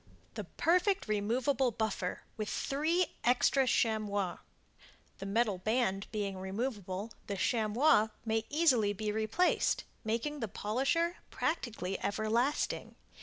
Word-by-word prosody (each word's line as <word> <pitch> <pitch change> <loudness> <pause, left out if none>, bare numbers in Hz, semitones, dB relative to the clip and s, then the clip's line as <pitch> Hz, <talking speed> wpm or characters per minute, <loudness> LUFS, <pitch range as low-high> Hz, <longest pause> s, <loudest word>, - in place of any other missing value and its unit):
The - - -5
Perfect 365 - +1
Removable 240 +6 +1
Buffer 215 -5 -2
with 215 -2 -3
3 320 +6 +1 0.2
Extra 255 +2 +3
Chamois 210 -6 +1 0.8
The 195 - -5
Metal 205 -2 +1
Band 215 -1 0
being 200 -3 -3
removable, 200 0 -3 0.2
the 200 - -3
Chamois 220 +3 +3 0.2
may 225 0 +1
be 220 - -24
easily 260 -10 +3
replaced, 215 - +1 0.2
making 235 +7 -2
the 225 - -2
polisher 270 - 0
practically 225 - -2
everlasting. 225 +7 0
220 Hz, 110 wpm, -32 LUFS, 205-270 Hz, 0.8 s, Extra